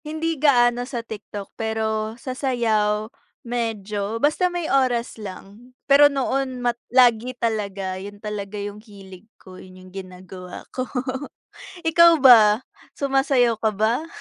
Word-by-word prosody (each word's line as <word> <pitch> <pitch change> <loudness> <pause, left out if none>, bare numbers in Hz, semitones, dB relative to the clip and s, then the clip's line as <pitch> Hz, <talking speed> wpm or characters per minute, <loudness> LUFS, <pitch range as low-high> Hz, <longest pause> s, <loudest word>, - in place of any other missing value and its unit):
Hindi 315 +2 -2
gaano 245 -4 +4
sa 235 -4 -5
TikTok 210 -2 -8
pero 220 0 -2
sa 255 +1 -6
sayaw 220 -5 0 0.4
medyo, 220 -3 -3
basta 300 +8 +1
may 350 -2 -4
oras 250 -5 0
lang. 205 +5 -11
Pero 285 +1 +6
noon 270 -1 -2
ma 240 - +2 0.2
lagi 245 0 +3
talaga 200 -5 -3
yun 205 +1 -9
talaga 210 -1 -6
yung 205 +1 -6
hilig 200 -1 -14
ko, 185 -1 -14
yun 185 0 -14
yung 185 0 -15
ginagawa 185 -1 -10
ko. 255 0 -4 0.9
Ikaw 330 -2 +5
ba 225 -3 +7 0.3
sumasayaw 270 -4 +1
ka 220 -1 0
ba? 225 +9 0
225 Hz, 130 wpm, -22 LUFS, 205-260 Hz, 0.9 s, ba